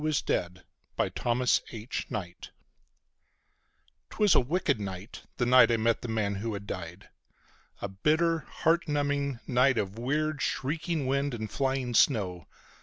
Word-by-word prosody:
A 155 - +1
skeleton 90 -10 -1 0.3
that - - -2
was 125 +1 +3 0.5
alive! 90 -4 -4 1.7
It - - -13
was 210 -3 +4
a - - +6
wicked 140 -1 0
night, 95 +1 -7 0.2
the 120 - +1
night 125 +1 +7
I 115 - +3
met 115 +1 +1
the - - -5
man 110 -3 -1
who 110 +2 -3
had 100 0 -7
died. 90 -1 -7 0.7
A - - 0
bitter, 155 - +1
heart 170 +2 0
numbing 145 -3 -1
night 130 0 +3
of 100 +1 -2
weird, 150 +4 -1
shrieking 155 +2 -1
wind 140 0 0
and 110 -2 -5
flying 130 -2 -1
snow. 95 - +2
125 Hz, 145 wpm, -29 LUFS, 105-145 Hz, 1.7 s, night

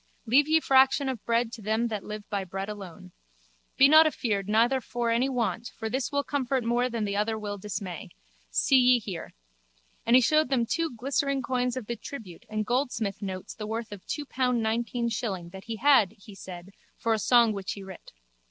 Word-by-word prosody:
Leave 270 +6 +4
ye 320 +1 +4
fraction 270 -1 +4
of 255 -5 -4
bread 230 0 +1
to 230 - -9
them 220 +3 0
that 215 -4 -3
live 210 -1 -7
by 200 -2 -2
bread 195 +1 -5
alone. 190 -3 -9 0.7
Be 270 - +8
not 310 +2 +8
afeard 210 -9 -2
neither 235 +5 +3
for 240 -1 -2
any 245 +4 +2
want 230 -3 -1
for 220 -1 -4
this 260 +1 -1
will 285 0 0
comfort 270 -2 -1
more 240 +2 +1
than 230 -3 -2
the 200 0 -2
other 215 +2 0
will 205 -1 -5
dismay. 190 -1 -6 0.4
See 270 - +3
ye 250 0 +5
here. 195 -7 -7 0.7
And 235 - +4
he 255 - +7
showed 305 +3 +3
them 250 -4 +2 0.3
glistering 275 +2 0
coins 250 0 -1
of 250 - -5
the 235 - -3
tribute 215 -7 -10
and 215 0 -2
goldsmith 240 -5 -1
notes 190 -2 -5
the 210 - -7
worth 225 0 -4
of 205 -3 -9
two 295 - -3
pound 250 -3 0
nineteen 235 +2 -1
shilling 200 -6 -3
that 190 +2 -11
he 230 -1 -4
had, 230 -5 +4
he 200 +1 -13
said, 185 -1 -10 0.3
for 230 - 0
a 220 - 0
song 235 0 +4
which 195 -2 -4
he 200 - -9
writ. 190 -1 -11
230 Hz, 200 wpm, -27 LUFS, 205-255 Hz, 0.7 s, Be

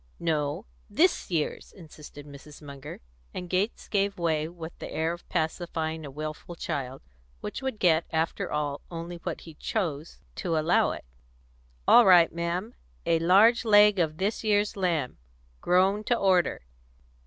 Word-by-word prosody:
"No; 155 +3 -1 0.2
this 325 - +2
year's," 165 -4 -2
insisted 150 -4 -13
Mrs. 145 +1 -13
Munger; 140 -1 -10 0.3
and 180 - -5
Gates 185 +5 -1
gave 200 -1 0
way 160 -3 0
with 165 -1 -9
the - - -7
air 160 +1 -1
of 175 - -12
pacifying 160 -1 -2
a 145 - -7
wilful 155 +4 -7
child, 135 -4 -5 0.4
which - - -5
would 265 -4 -3
get, 165 -4 +3
after 160 0 -1
all, 145 -1 -2
only 170 0 -6
what - - -5
he 165 - -12
chose 160 -3 -4 0.2
to 170 -4 -1
allow 155 +3 +3
it. - - -6 0.8
"All 240 -4 +7
right, 175 -3 +6
ma'am; 170 +7 -3 0.3
a 165 - +2
large 200 +9 +5
leg 210 -2 +6
of 155 -2 0
this 200 +6 -2
year's 205 -1 +1
lamb 170 - -1 0.4
grown 190 +4 +2
to 240 - +2
order. 185 - +2
170 Hz, 150 wpm, -27 LUFS, 155-195 Hz, 0.8 s, All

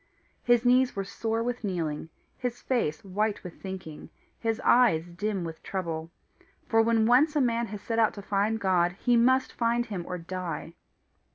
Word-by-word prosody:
His 240 0 +3
knees 250 +1 +4
were 195 - -1
sore 225 +3 -2
with 245 0 -3
kneeling, 165 -6 -3 0.3
his 245 -1 -4
face 190 - -1
white 205 +2 -1
with 180 -3 -10
thinking, 185 -5 -7 0.3
his 225 -1 -1
eyes 230 -10 +4
dim 190 +2 -3
with 165 -1 -7
trouble; 165 -4 -4 0.6
for 225 0 +4
when 225 -1 +3
once 275 +7 +4
a - - +3
man 235 -2 +1
has 210 -1 -7
set 230 -1 -1
out 220 - +3
to 200 - -8
find 205 +3 0
God, 180 -3 +2
he 240 +5 +1
must 260 +2 +3
find 235 0 +1
him 200 -6 -5
or 180 - -3
die. 175 -1 -5
215 Hz, 175 wpm, -28 LUFS, 180-235 Hz, 0.6 s, knees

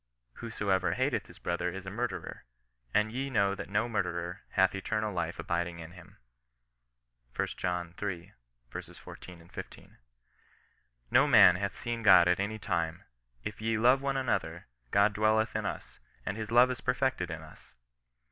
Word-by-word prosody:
Whosoever 95 -6 0
hateth - - 0
his - - -15
brother 90 +1 -2
is 95 +1 -7
a 95 - -5
murderer, 100 -6 -4 0.5
and 105 +1 +2
ye 135 +3 -3
know 100 -6 +2
that 100 - -7
no 110 +4 +1
murderer 90 -3 -2
hath 95 -1 +4
eternal 105 +2 -2
life 85 -2 -2
abiding 85 0 -2
in 85 0 -9
him." 90 -1 -15 1.2
lb. 90 0 -3
iii. 90 -4 -4 0.4
14, 85 -2 -10
16. - - -10 0.6
" - - -38
No - - +5
man 90 - +8
hath 100 +1 -3
seen 120 -1 -3
God 95 -5 +7
at 90 +1 +3
any 105 +2 -2
time. 85 -5 -2 0.4
If - - -6
we 110 0 0
love 125 +4 +4
one 140 -1 -1
another, 85 -10 -1 0.2
God 100 +5 +4
dwelleth 110 +1 +2
in - - -1
us, - - -7 0.3
and 100 - -2
his 110 -1 -5
love 120 +2 +6
is 125 - -5
perfected 125 -7 0
in 80 -1 -6
us." 80 - -16
100 Hz, 155 wpm, -30 LUFS, 85-110 Hz, 1.2 s, man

